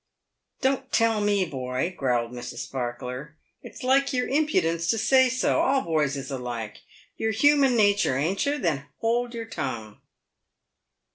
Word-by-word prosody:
"Don't 265 -1 0
tell 225 -2 +2
me, 205 -2 +2
boy!" 130 +3 -3
growled 120 -3 0
Mrs. 125 0 -7
Sparkler. 125 +3 -5 0.3
"It's - - -11
like 270 +2 +3
your 250 -2 0
impudence 170 - +1
to 225 - +2
say 260 +4 +4
so. 255 +1 +1
All 270 0 +2
boys 150 -4 0
is 135 +1 -6
alike. 120 -5 -5 0.4
You're 220 - -1
human 275 +3 +4
natur', 205 - +3
ain't 165 +8 0
you? 290 +1 +1
Then 150 - -1
hold 240 +1 -1
your 230 -1 -4
tongue." 115 - -5
185 Hz, 145 wpm, -25 LUFS, -, 0.4 s, say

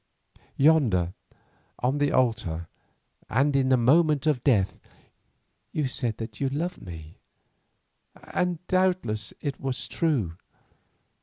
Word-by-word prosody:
Yonder 125 - +3 0.6
on 130 +4 0
the 145 - +2
altar 110 -10 0 0.6
and 140 +4 +2
in 130 -1 +2
a 130 - +6
moment 150 +4 +3
of 150 -6 +1
death 105 -9 +2 0.9
you 150 -3 0
said 120 -3 -1
that 110 -2 -7
you 135 - +1
loved 170 +6 -3
me, 80 -3 -10 1.1
and 180 -1 0
doubtless 185 - 0
it 140 -3 -3
was 135 -2 -3
true. 125 - 0
130 Hz, 110 wpm, -26 LUFS, 110-155 Hz, 1.1 s, a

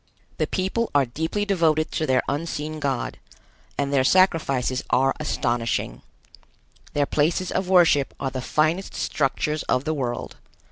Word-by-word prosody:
The - - +1
people 190 +5 -1
are 140 -2 +5
deeply 160 - -2
devoted 160 -6 +1
to 155 - -1
their 130 -1 +2
unseen 155 0 -3
God, 135 -4 -2 0.6
and 140 0 -1
their 135 -2 +4
sacrifices 135 -7 +2
are 135 +1 +3
astonishing. 120 - -1 0.9
Their 145 -1 +2
places 165 +6 0
of 185 -1 -1
worship 170 -7 +4
are 135 - -2
the 130 0 -4
finest 155 +8 0
structures 150 +2 -1
of 130 - +2
the 155 - -1
world. 125 -5 -4
150 Hz, 140 wpm, -24 LUFS, 130-165 Hz, 0.9 s, are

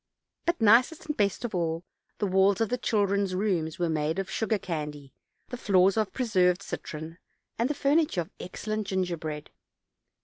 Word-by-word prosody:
But, 340 0 +1
nicest 235 +8 +4
and 300 -1 -2
best 205 +3 0
of 235 - -4
all, 165 -1 -1 0.3
the 210 - 0
walls 190 0 +3
of 225 -2 +1
the 250 - 0
children's 200 -4 +1
rooms 180 -6 0
were 175 - 0
made 155 +1 0
of 195 -1 -3
sugar 220 -1 0
candy, 150 -6 -5 0.4
the 245 - -5
floors 195 -4 +4
of 220 -2 0
preserved 190 -7 +2
citron, 160 +2 -6 0.4
and 235 +3 +2
the 300 - -1
furniture 285 - +2
of 165 - -8
excellent 215 +3 -4
gingerbread. 170 -6 -3
195 Hz, 165 wpm, -28 LUFS, 170-220 Hz, 0.4 s, nicest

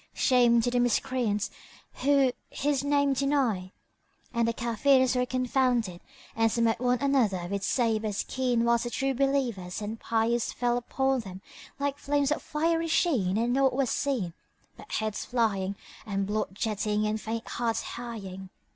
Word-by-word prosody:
Shame 240 -3 +4
to 245 - 0
the 245 - +1
Miscreants 245 -3 0 0.5
who 275 -1 +4 0.2
His 280 -1 -1
name 285 -1 +2
deny!" 260 -9 0 0.6
And 235 -1 +1
the - - +2
Kafirs 255 +3 +2
were 250 0 +1
confounded 250 -7 0 0.3
and 225 0 +2
smote 230 0 +1
one 250 0 +2
another 235 -11 +2
with 200 +1 -3
sabres 220 -4 0
keen 250 -3 0
whilst 235 0 +2
the - - -2
True 270 +3 -1
Believers 250 -9 -1
and 215 +1 -5
pious 230 +1 0
fell 240 -1 0
upon 265 +2 0
them 190 -4 -8 0.3
like 280 0 -2
flames 285 0 +1
of 300 - 0
fiery 330 +2 0
sheen 260 - +2
and 235 +2 +1
naught 270 0 +3
was 265 -1 0
seen 240 -12 -1 0.4
but - - -14
heads 215 -1 -2
flying 200 -5 0 0.3
and 195 -2 -2
blood 210 +2 -1
jetting 210 0 -1
and 215 0 -1
faint 225 +1 -4
hearts 230 -2 -1
hieing. 195 -6 -7
240 Hz, 155 wpm, -28 LUFS, 215-270 Hz, 0.6 s, Shame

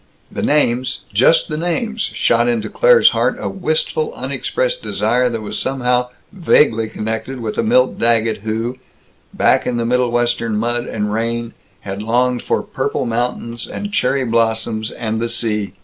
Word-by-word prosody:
The - - -4
names, 130 -3 +1
just 130 +10 +4
the 155 - -3
names, 215 +7 -2
shot 120 - +1
into 115 -3 -1
Claire's - - +6
heart - - +1
a - - -4
wistful 470 -1 -1
unexpressed - - -2
desire 120 +4 +1
that 115 -2 -4
was 105 - -3
somehow 125 -2 0 0.2
vaguely 145 - +2
connected 110 +4 -4
with 110 -2 -4
a - - +5
Milt 125 +3 +2
Daggett 115 -1 +2
who, 115 +4 -3 0.5
back - - +2
in 125 - 0
the 115 - -1
Middlewestern 120 -2 +1
mud 120 +2 -1
and 105 -1 -2
rain, 115 +1 -2 0.3
had 100 0 -5
longed 125 +3 +1
for - - -1
purple - - -2
mountains 115 0 -3
and 205 0 -6
cherry 135 -3 +1
blossoms 115 -1 0
and 110 -2 -3
the 115 - -1
sea. 105 -4 -2
120 Hz, 155 wpm, -18 LUFS, 115-130 Hz, 0.5 s, Claire's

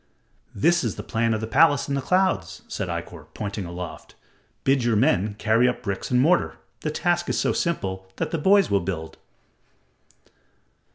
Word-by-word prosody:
"That 170 +11 +3
is 115 -5 -2
the - - -7
plan 115 0 0
of 110 -1 -1
the - - -2
palace 145 +5 +4
in 140 - -2
the 140 - 0
clouds," 180 - 0
said - - -4
Ikkor, - - -6
pointing 100 -2 -4
aloft. 85 -1 -8 0.5
"Bid 135 -2 +2
your 120 -2 +2
men 105 - +2
carry 115 +3 +3
up 125 - -2
bricks 100 -2 -3
and 125 - +3
mortar. 170 +7 +2 0.2
The 155 - -3
task 175 +2 0
is - - 0
so - - +1
simple 95 - -2
that - - -3
the 165 - -1
boys 195 - +4
will 100 - +4
build." 85 -3 -5
115 Hz, 175 wpm, -24 LUFS, 100-160 Hz, 0.5 s, palace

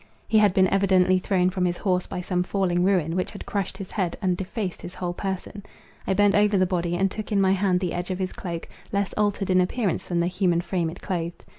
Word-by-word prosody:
He 220 - +4
had 205 -3 +4
been 190 0 +5
evidently 185 -1 +3
thrown 185 -1 +1
from 185 0 -1
his 175 -1 0
horse 180 -3 0
by 180 - -4
some 180 0 -1
falling 180 -1 0
ruin, 180 -4 +2
which 185 - -1
had - - -9
crushed 195 -2 -3
his 195 -2 -8
head, 185 -5 -2
and 185 -3 +1
defaced 190 0 -4
his 175 - -8
whole 175 -1 -3
person. 195 +2 -5 0.5
I 190 - +2
bent 205 0 +4
over 205 0 +4
the 185 - +4
body, 175 -2 -1
and 195 +1 +1
took 215 +1 -6
in 205 - +2
my 190 -1 +4
hand 190 -1 +2
the 180 -2 -2
edge 175 +1 -3
of 185 - -2
his 185 -1 -3
cloak, 170 -3 -5 0.2
less 200 -1 -1
altered 205 -2 0
in 185 0 +5
appearance 195 +1 -1
than 175 -1 0
the 170 - +2
human 180 -1 +1
frame 175 -2 -1
it 170 - -10
clothed. 175 -3 -4
185 Hz, 245 wpm, -25 LUFS, 180-195 Hz, 0.5 s, been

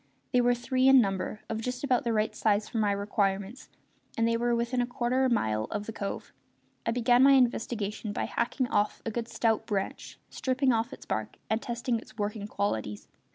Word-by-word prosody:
They 250 - +5
were 245 0 +3
three 255 +2 +1
in 270 0 +8
number, 195 -1 -1
of 220 0 -3
just 250 +2 -4
about 255 -4 +2
the 235 - +1
right 215 -1 0
size 210 -1 +1
for 230 - -3
my 210 -2 +2
requirements, 200 +2 -1 0.5
and 230 0 +3
they 230 - +2
were 240 +1 +1
within 240 +2 0
a 240 - -1
quarter 250 +1 0
of 255 - +1
a - - +5
mile 110 - 0
of 210 - -4
the 225 - -6
cove. 200 -1 -5 0.5
I - - +3
began 245 +1 +4
my 275 +1 +7
investigation 225 -4 +1
by - - -2
hacking 255 +2 -1
off 205 0 0
a 225 - -2
good 230 +1 -3
stout 225 -2 0
branch, 195 -2 -3
stripping 260 0 +1
off 230 +2 0
its - - -10
bark, 110 0 -3
and 220 +1 +1
testing 235 0 -2
its 215 -1 -16
working 205 0 -3
qualities. 110 - -3
230 Hz, 205 wpm, -29 LUFS, 205-245 Hz, 0.5 s, in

